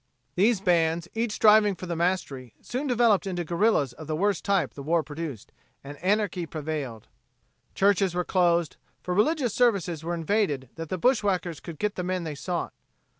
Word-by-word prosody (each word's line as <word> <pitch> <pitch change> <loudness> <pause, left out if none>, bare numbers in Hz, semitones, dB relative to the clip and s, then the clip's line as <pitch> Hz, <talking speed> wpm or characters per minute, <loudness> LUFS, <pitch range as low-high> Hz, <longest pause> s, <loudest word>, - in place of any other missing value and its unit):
These 200 +4 +2
bands, 170 -2 +2
each 230 0 -1
striving 210 -2 +5
for 185 - -8
the 170 -1 -3
mastery, 160 -8 -2
soon 260 +4 -4
developed 235 -6 +3
into 175 -2 -2
guerrillas 170 - +1
of 155 +4 -11
the 155 - -1
worst 200 +3 0
type 200 -3 +1
the 140 - -8
war 160 +3 +1
produced, 150 -6 -7 0.3
and 140 +1 -8
anarchy 190 -2 0
prevailed. 145 -8 -5 0.7
Churches 195 -2 +2
were 180 -1 0
closed, 170 -3 +1 0.3
for 180 - -2
religious 245 - +1
services 190 -10 +1
were 170 +1 -2
invaded 165 - 0
that 165 -1 -7
the 185 - -2
bushwackers 185 - +1
could 165 -2 -9
get 210 +3 -1
the 180 - -2
men 180 0 -2
they 160 -2 -4
sought. 170 +4 -4
180 Hz, 175 wpm, -26 LUFS, 160-205 Hz, 0.7 s, striving